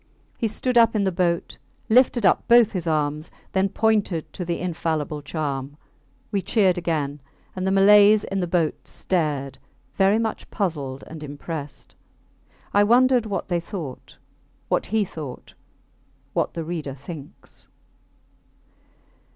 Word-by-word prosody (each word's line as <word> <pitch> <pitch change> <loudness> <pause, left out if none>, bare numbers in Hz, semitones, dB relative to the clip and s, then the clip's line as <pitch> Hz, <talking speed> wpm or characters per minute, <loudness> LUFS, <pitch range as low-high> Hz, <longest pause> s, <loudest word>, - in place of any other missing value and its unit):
He 230 - -1
stood 240 +3 +1
up 230 -1 +4
in 205 - +2
the 190 - +1
boat, 170 -1 -1 0.3
lifted 240 -1 +4
up 185 - +3
both 235 -2 +6
his 180 -4 -4
arms, 150 0 0 0.2
then 190 +1 +1
pointed 205 -6 0
to 180 - -5
the 170 -1 -2
infallible 160 -4 -2
charm. 145 -2 -4 0.5
We 200 - 0
cheered 190 -3 +2
again; 150 -5 -2 0.3
and 185 0 -2
the - - +2
Malays 205 +2 +6
in 195 - -3
the 180 - -1
boats 170 -3 -1
stared 145 -7 -2 0.3
very 195 +2 +3
much 225 -1 -3
puzzled 145 -9 -3
and 160 -1 -10
impressed. 145 0 -7 0.8
I 205 - +5
wondered 245 +1 +4
what 200 - -3
they 175 -2 0
thought; 170 -6 -8 0.5
what - - 0
he 215 0 +1
thought;... 155 -8 -9 0.8
what - - -1
the 165 - -3
reader 155 -5 -5
thinks? 140 +1 -11
175 Hz, 135 wpm, -23 LUFS, 150-205 Hz, 0.8 s, both